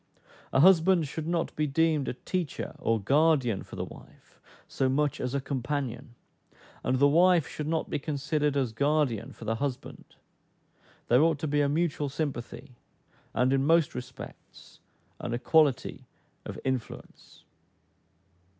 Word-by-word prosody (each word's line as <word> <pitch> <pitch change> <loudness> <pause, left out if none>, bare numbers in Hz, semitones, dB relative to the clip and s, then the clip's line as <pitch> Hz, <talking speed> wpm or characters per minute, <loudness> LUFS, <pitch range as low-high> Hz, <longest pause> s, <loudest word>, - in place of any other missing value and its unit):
A 135 - +3
husband 180 -1 +5
should 155 +3 -5
not 170 -1 -1
be 150 0 0
deemed 155 -1 +1
a - - -3
teacher 175 +1 -4
or 115 -1 +1
guardian 135 -1 +2
for - - -11
the - - -3
wife - - -16 0.3
so 130 - 0
much 145 +1 0
as 125 +2 -2
a - - +1
companion; 130 -2 -4 0.7
and 130 - +1
the 140 +2 +5
wife 170 +1 +4
should 150 - -5
not 160 0 -1
be - - -2
considered 150 0 -1
as 130 -4 0
guardian 140 -3 0
for 115 - -11
the 110 - 0
husband: 135 -1 -5 1.0
there 125 +3 +5
ought 160 -1 +3
to 155 - -3
be 145 0 +1
a 140 - +2
mutual 150 -2 0
sympathy, 135 -4 -5 0.6
and 125 +3 +2
in 135 0 +2
most 165 0 +3
respects 125 - -10 0.4
an 120 - -3
equality 145 0 +1 0.4
of - - -6
influence. 130 -3 -5
145 Hz, 145 wpm, -28 LUFS, 130-155 Hz, 1.0 s, husband